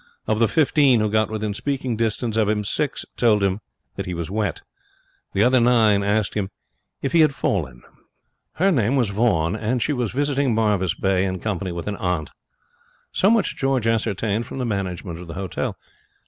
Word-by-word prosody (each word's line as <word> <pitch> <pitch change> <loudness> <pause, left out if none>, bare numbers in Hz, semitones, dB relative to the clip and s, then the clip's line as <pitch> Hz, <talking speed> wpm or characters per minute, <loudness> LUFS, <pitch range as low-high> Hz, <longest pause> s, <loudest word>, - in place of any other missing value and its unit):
Of 110 0 0
the 115 - +4
fifteen 145 -4 +3
who 105 -1 0
got 110 0 +2
within 110 -1 -3
speaking 130 +1 -2
distance 115 0 -1
of 110 -2 +2
him, 105 -1 0
six 145 +7 -2
told 110 -4 +3
him 95 +1 +1 0.4
that - - -4
he 90 - -3
was 85 +1 -4
wet. 105 -1 -2 0.7
The 100 - +3
other 125 +2 +4
nine 115 -4 +4
asked 100 0 0
him 100 -2 -2 0.5
if 135 - -1
he 170 - +4
had 155 -3 +4
fallen. 60 - -2 0.7
Her 195 +4 +2
name 125 - +2
was 120 -7 +1
Vaughan, 100 -5 +1
and 110 +3 -1
she 150 - 0
was 125 -5 -1
visiting 140 -2 +1
Marvis 105 -6 +1
Bay 95 -1 +1
in 95 -1 -2
company 95 -2 -3
with 85 -1 -5
an 105 -1 -3
aunt. 90 -4 -2 0.8
So 195 - +3
much 230 -1 +2
George 135 -4 0
ascertained 110 -1 0
from - - -7
the 130 - -2
management 95 -5 -3
of 90 - -9
the 85 - -8
hotel. 95 -2 -3
110 Hz, 190 wpm, -22 LUFS, 95-125 Hz, 0.8 s, the